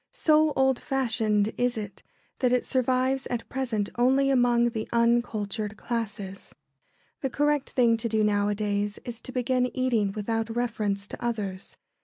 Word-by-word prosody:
So 310 0 +3
old 265 -1 +3
fashioned 220 -5 0
is 245 -1 +1
it 205 -2 -6 0.4
that 250 -2 +2
it 250 -1 +2
survives 260 +1 +1
at 240 -2 -4
present 235 -6 -1
only 265 +3 +3
among 240 -2 +3
the 220 -2 -4
uncultured 220 -3 0
classes. 210 -5 -5 0.6
The 270 - -2
correct 295 +1 +1
thing 235 -3 +3
to 230 +1 -2
do 220 -1 +2
nowadays 205 0 0
is 240 -1 -6
to - - -6
begin 250 0 +1
eating 235 -6 +1
without 225 +2 -2
reference 215 -5 -1
to 225 - -9
others. 205 -5 -4
235 Hz, 145 wpm, -27 LUFS, 210-255 Hz, 0.6 s, So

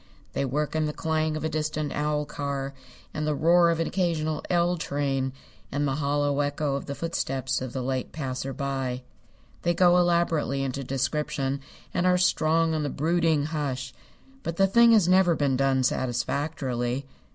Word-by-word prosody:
They 140 - 0
work 150 +4 -2
in 155 -1 +1
the 150 - -3
clang 155 -1 -1
of 155 - -5
a - - +1
distant 155 -1 -2
owl 150 0 0
car, 140 -1 -4 0.4
and 155 -1 -2
the 150 - +1
roar 170 +3 +5
of 165 -1 +1
an 165 - +1
occasional 160 -5 -1
"L" 175 0 +2
train, 140 -4 -1 0.4
and 145 +1 0
the 135 0 -1
hollow 145 0 0
echo 145 0 0
of 140 - -4
the 140 - -4
footsteps 135 -6 -2
of 130 -2 -4
the 130 0 -3
late 130 0 -2
passer 135 -2 -4
by. 135 -2 -3 0.6
They 175 0 +1
go 175 0 +5
elaborately 170 -5 +1
into 135 +1 -3
description, 135 +1 -1 0.3
and 180 - +1
are 180 0 +4
strong 165 -2 +2
on 155 - 0
the 145 - -1
brooding 160 0 +1
hush, 140 -4 -3 0.5
but 165 -7 -4
the 195 - +5
thing 235 +4 +6
has 205 -6 +5
never 185 -2 +5
been 140 -3 +1
done 135 0 +2
satisfactorily. 130 0 -1
150 Hz, 175 wpm, -26 LUFS, 135-165 Hz, 0.6 s, thing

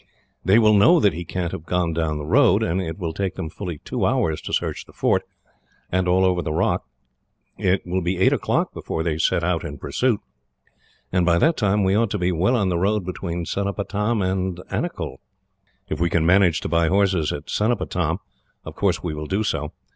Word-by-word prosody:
They 95 +3 +5
will 110 -2 +5
know 135 - +6
that 100 - +3
he 85 +3 -5
can't 85 0 -3
have 80 - -6
gone 90 -2 0
down 80 -2 -1
the 75 - -5
road, - - +4
and 90 +3 0
it 80 -1 -5
will 85 -5 -3
take 95 +1 -2
them 80 -4 -5
fully 90 -5 -6
two - - -2
hours 80 -1 +1
to - - -7
search - - -1
the - - -18
fort, - - +1 0.7
and 90 0 +1
all 95 +1 +3
over 90 -1 +2
the 75 - -3
rock. 75 - 0 0.7
It 95 0 0
will 90 +1 -1
be 90 +2 -1
eight 95 - +4
o'clock - - 0
before 80 - -4
they 80 -2 -1
set 85 +1 +1
out 85 -1 0
in 75 -4 -6
pursuit, 105 - 0 0.9
and 90 -1 +2
by 85 -1 +3
that 160 - +3
time 105 -2 +1
we 95 0 +2
ought 110 +1 +2
to 105 - -2
be 90 -1 0
well 90 +9 +2
on 100 -6 +1
the 85 -2 0
road 100 +1 +1
between 85 -2 -4
Cenopatam 100 +3 -1
and 95 -1 -1
Anicull. - - -3 0.7
"If - - -4
we 85 0 +2
can 80 -1 +1
manage 90 -1 +4
to - - -3
buy 85 -1 +2
horses 95 -3 +2
at 75 +1 -5
Cenopatam, 90 -7 0 0.5
of - - -7
course - - 0
we - - -2
will 75 0 -5
do 100 +5 0
so. 75 -7 -2
90 Hz, 210 wpm, -22 LUFS, 85-100 Hz, 0.9 s, know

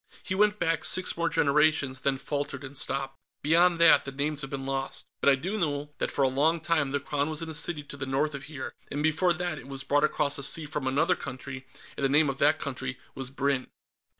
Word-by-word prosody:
He - - -2
went 210 +2 +3
back 165 -3 0
six 185 - +2
more 170 -1 0
generations, 145 -3 +2
then 135 -1 +1
faltered 140 0 -4
and 135 +1 -9
stopped. 135 0 -2 0.2
"Beyond 170 +3 +4
that, 170 - +7
the 135 - -6
names 145 +2 -2
have 135 - -5
been 135 -1 -5
lost. 135 0 -3
But - - +4
I 140 - +6
do 185 +11 -3
know 145 -3 -2
that - - -1
for 140 - +1
a - - +5
long 150 +6 +2
time 155 -3 +1
the 145 +1 -1
Crown 145 +1 -2
was 155 +1 -3
in 165 - -6
a - - -5
city 155 0 -1
to 145 - -10
the 135 -1 -4
north 145 +3 0
of 140 -1 -6
here, 140 -4 -7 0.2
and 145 +1 -3
before 160 +3 +3
that 175 -2 -3
it 130 - -12
was 135 -1 -5
brought 145 +2 +2
across 145 -1 +1
the - - -4
sea 155 +3 +1
from 145 -2 -3
another 160 +7 +2
country, 130 -1 -8 0.3
and - - -5
the 135 - +3
name 145 0 +4
of 135 - -10
that 145 +2 +4
country 130 -2 -4 0.2
was 135 -1 -6
Brinn." 135 -1 0
145 Hz, 240 wpm, -28 LUFS, 135-155 Hz, 0.3 s, that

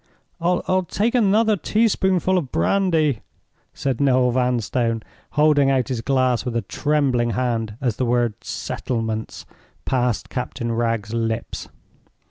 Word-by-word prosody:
"I'll 180 +1 +1
take 225 +3 0
another 220 -1 +3
teaspoonful 190 -2 +1
of 155 -8 -1
brandy," 155 - +1 0.5
said 135 -2 -2
Noel 130 -2 +3
Vanstone, 120 -2 0 0.3
holding 150 -2 +4
out 135 0 +1
his 125 -4 -2
glass 130 -1 +1
with 125 -2 -4
a 115 - 0
trembling 135 -6 0
hand 115 -4 -1
as 120 -5 -1
the 130 - 0
word 120 -3 0
"settlements" 110 -3 -4 0.4
passed 125 -4 0
Captain 120 -2 -4
Wragge's 115 -2 -1
lips. 115 0 -3
125 Hz, 120 wpm, -22 LUFS, 115-155 Hz, 0.5 s, holding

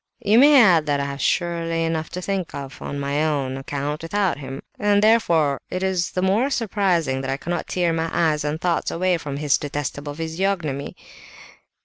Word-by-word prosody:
"You 215 +3 +5
may 285 +1 +7
add 175 -10 +5
that 145 -1 +1
I 140 - -1
have 140 0 -5
surely 165 -2 0
enough 160 -1 -2
to 180 +1 -6
think 195 -3 -3
of, 140 -1 -8
on 140 - -5
my 140 +2 0
own 140 -4 -1
account, 140 +2 -4
without 185 -1 -1
him; 135 -1 -7 0.2
and 205 0 +3
therefore 170 -11 +3
it 185 +1 -3
is 185 -2 0
all - - -20
the - - +3
more 220 +8 +2
surprising 185 - 0
that 135 - -4
I 135 - -1
cannot 175 +3 -4
tear 175 -2 0
my 165 0 -1
eyes 155 -3 +1
and 150 +1 -2
thoughts 175 -1 0
away 180 0 0
from 145 -3 -5
his 145 -1 +2
detestable 145 0 -4
physiognomy." 160 -3 -2
165 Hz, 195 wpm, -22 LUFS, 145-185 Hz, 0.2 s, may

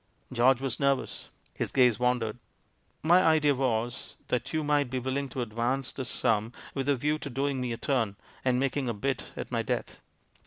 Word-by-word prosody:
George 125 +1 +4
was 135 -3 -2
nervous. 140 -2 0 0.3
His - - -3
gaze 125 -5 +4
wandered. 125 -2 +1 0.6
"My 175 +4 +6
idea 155 -4 +4
was, 120 -3 -1
that 125 - -1
you 155 -1 0
might 145 -2 +2
be 130 - -2
willing 130 +2 -2
to 125 0 -2
advance 120 +4 -1
the 130 - -5
sum, 110 0 0 0.2
with 135 0 -2
a 140 - +4
view 150 +4 0
to 140 - -5
doing 135 +1 -1
me 125 -1 -2
a 115 - -3
turn, 115 -8 0 0.3
and 125 -1 +2
making 135 -1 0
a 115 - -2
bit 130 +5 -2
at - - -5
my - - +1
death. - - -3
130 Hz, 190 wpm, -29 LUFS, 120-140 Hz, 0.6 s, My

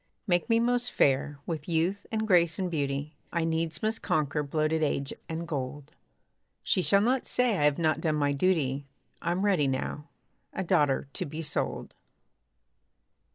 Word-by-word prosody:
Make 175 +2 +1
me 230 0 +4
most 245 +1 +1
fair! 140 +1 +2
with 155 -4 -4
youth 175 +5 0
and 220 -1 0
grace 170 -5 +4
and 185 -2 -2
beauty, 145 -1 -2 0.2
I 170 -2 0
needs 160 0 -1
must 220 +1 0
conquer 150 -1 0
bloated 155 +2 0
age 140 -2 0 0.2
and 165 +1 -4
gold. 145 0 -4 0.7
She 185 - +2
shall 200 +2 +4
not 250 +4 +1
say 250 -3 +2
I 145 - +3
have 150 -1 +3
not 160 -2 +1
done 155 -2 +1
my 145 -1 +1
duty; 140 -3 +1 0.3
I'm 180 +4 0
ready 180 -9 +3
now 145 +3 -3 0.4
a - - -2
daughter 145 -5 +2
to - - -3
be 155 +3 -5
sold! 150 - -3
160 Hz, 160 wpm, -28 LUFS, 145-185 Hz, 0.7 s, me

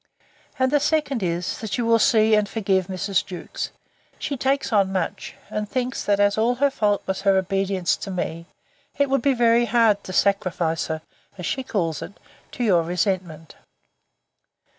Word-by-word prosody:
And 260 0 +2
the 290 - +4
second 295 -4 0
is, 175 -1 -2
That 220 +1 -3
you 240 - 0
will 230 0 +4
see 220 -3 +4
and 210 -1 +3
forgive 190 -4 0
Mrs. 190 0 -1
Jewkes: 180 -3 -6 0.5
she 285 - -3
takes 270 -1 0
on 195 -2 +3
much, 185 -3 -3
and 210 -1 -4
thinks 250 -1 -2
that, 205 -1 +2
as 205 +1 +3
all 235 +3 +2
her 280 +2 +2
fault 210 -6 0
was 190 0 -2
her 195 -1 +3
obedience 190 -1 0
to - - -7
me, 170 -2 -4 0.5
it 280 -1 +1
would 275 - +2
be 275 +1 +2
very 235 0 +4
hard 225 -3 +3
to - - -6
sacrifice 185 -4 +1
her, 160 -1 -4 0.3
as 180 - -6
she 265 - -1
calls 170 - -2
it, 200 - -9 0.3
to 245 - -3
your 185 -7 +4
resentment. 175 -2 -2
205 Hz, 175 wpm, -23 LUFS, 185-240 Hz, 0.5 s, the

